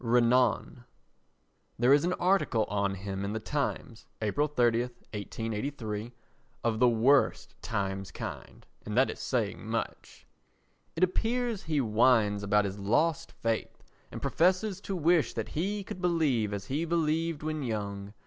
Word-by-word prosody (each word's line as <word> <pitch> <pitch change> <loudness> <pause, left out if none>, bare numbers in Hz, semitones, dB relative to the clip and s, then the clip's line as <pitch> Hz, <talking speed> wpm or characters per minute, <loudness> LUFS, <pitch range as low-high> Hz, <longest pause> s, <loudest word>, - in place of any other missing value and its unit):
Renan 120 +1 +2 0.9
There 125 +4 +5
is 145 - +4
an 180 +1 +1
article 180 - +2
on 100 -1 0
him 95 0 -5
in 100 +1 -2
the 110 - -2
Times, 135 -2 -3
April 115 +8 +1
30, 120 -5 +2
1883, 115 0 -5 0.5
of 115 -2 0
the 125 0 +6
worst 125 +5 +3
Times 95 -4 -3
kind, - - -8 0.2
and 105 +2 -4
that 130 - +4
is - - -10
saying 115 -6 -1
much. 110 +1 -5 0.7
It 165 - 0
appears 230 +3 0
he 155 -3 -1
whines 110 -2 +3
about 105 0 +2
his 100 +1 -4
lost 130 +11 +1
faith 115 -1 -3 0.3
and - - -7
professes 185 +3 +2
to 195 - -4
wish 170 -1 +2
that - - -3
he 200 +6 -2
could 185 - -8
believe 150 - +1
as 100 -1 -4
he 140 +8 -1
believed 165 -1 0
when 155 -1 -2
young. 100 -4 -4
120 Hz, 145 wpm, -29 LUFS, 105-160 Hz, 0.9 s, the